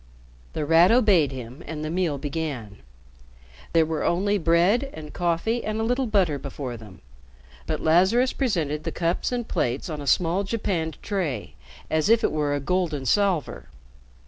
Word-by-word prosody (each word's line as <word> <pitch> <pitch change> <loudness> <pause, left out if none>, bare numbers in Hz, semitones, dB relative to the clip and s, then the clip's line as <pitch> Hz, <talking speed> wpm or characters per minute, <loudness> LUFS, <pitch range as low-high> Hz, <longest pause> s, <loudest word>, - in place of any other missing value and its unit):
The 150 - -2
Rat 165 +4 +6
obeyed 205 - +4
him 125 0 -8
and 155 0 -5
the 155 - -3
meal 170 -5 0
began. 140 -7 -4 0.9
There 165 -1 +4
were 160 0 -2
only 200 +4 +1
bread 180 - +3
and 150 -1 -9
coffee 175 +7 0
and 215 0 -2
a - - 0
little 250 +3 0
butter 185 -9 +1
before 135 -2 -6
them. 105 -6 -13 0.7
But - - -2
Lazarus 190 +11 +3
presented 160 - -1
the - - -3
cups 170 +6 -1
and 245 -2 -2
plates 125 +7 -2
on 150 -1 -5
a 140 - -7
small 180 +4 +2
japanned 190 -7 -2
tray 185 - -3 0.4
as 155 +4 +1
if 230 0 +4
it - - +2
were 150 -2 0
a - - -1
golden 155 -2 -1
salver. 170 - 0
165 Hz, 165 wpm, -25 LUFS, 145-200 Hz, 0.9 s, Rat